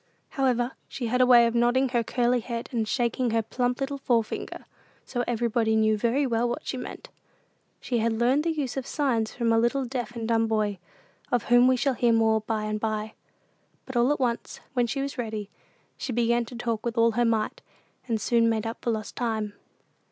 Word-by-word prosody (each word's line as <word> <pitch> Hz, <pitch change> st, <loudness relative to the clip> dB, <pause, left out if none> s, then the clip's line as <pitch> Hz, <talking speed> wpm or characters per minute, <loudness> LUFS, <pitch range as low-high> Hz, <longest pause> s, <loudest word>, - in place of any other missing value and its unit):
However, 250 Hz, -3 st, +1 dB, 0.2 s
she 250 Hz, -, -5 dB
had 250 Hz, +2 st, +1 dB
a 250 Hz, -, +5 dB
way 240 Hz, -2 st, +7 dB
of 230 Hz, -, 0 dB
nodding 240 Hz, +3 st, +3 dB
her 240 Hz, -2 st, +1 dB
curly 245 Hz, +1 st, +1 dB
head, 235 Hz, 0 st, -5 dB
and 225 Hz, -3 st, -1 dB
shaking 240 Hz, +1 st, 0 dB
her 225 Hz, 0 st, +1 dB
plump 245 Hz, +2 st, -1 dB
little 280 Hz, 0 st, -3 dB
forefinger; 230 Hz, -4 st, -1 dB, 0.4 s
so 245 Hz, -2 st, -2 dB
everybody 230 Hz, -1 st, +1 dB
knew 220 Hz, 0 st, +3 dB
very 240 Hz, +6 st, +1 dB
well 235 Hz, -1 st, +1 dB
what 240 Hz, -, -4 dB
she -, -, -3 dB
meant. 250 Hz, -, -7 dB, 0.7 s
She 240 Hz, -2 st, -1 dB
had 230 Hz, +1 st, +1 dB
learned 245 Hz, +6 st, +2 dB
the 335 Hz, -, 0 dB
use 290 Hz, -6 st, -3 dB
of 265 Hz, -, -3 dB
signs 240 Hz, -7 st, 0 dB
from 230 Hz, -2 st, +1 dB
a 225 Hz, -, +4 dB
little 245 Hz, +3 st, +1 dB
deaf 245 Hz, -1 st, -4 dB
and 225 Hz, -1 st, -4 dB
dumb 225 Hz, -1 st, +2 dB
boy 210 Hz, -3 st, 0 dB, 0.5 s
of 245 Hz, -3 st, +2 dB
whom 245 Hz, +1 st, +5 dB
we 255 Hz, 0 st, +4 dB
shall 270 Hz, +2 st, +1 dB
hear 240 Hz, -1 st, +2 dB
more 220 Hz, -1 st, +3 dB
by 215 Hz, 0 st, -2 dB
and 215 Hz, 0 st, -2 dB
by; 215 Hz, 0 st, -2 dB, 0.7 s
but 265 Hz, -, -8 dB
all 240 Hz, +3 st, +3 dB
at 295 Hz, -, 0 dB
once, 240 Hz, -3 st, -2 dB
when 245 Hz, -3 st, +2 dB
she 270 Hz, +3 st, -2 dB
was 275 Hz, -2 st, -5 dB
ready 215 Hz, -3 st, -4 dB, 0.5 s
she -, -, -4 dB
began 235 Hz, 0 st, +1 dB
to 245 Hz, -, -10 dB
talk 230 Hz, -2 st, -2 dB
with 235 Hz, 0 st, -3 dB
all 230 Hz, 0 st, +5 dB
her 240 Hz, +2 st, +1 dB
might, 230 Hz, -, 0 dB, 0.5 s
and 225 Hz, -3 st, 0 dB
soon 230 Hz, +1 st, +3 dB
made 220 Hz, -1 st, -1 dB
up 225 Hz, +1 st, -5 dB
for -, -, -2 dB
lost 220 Hz, -2 st, -3 dB
time. 220 Hz, -3 st, -2 dB
235 Hz, 210 wpm, -26 LUFS, 225-250 Hz, 0.7 s, way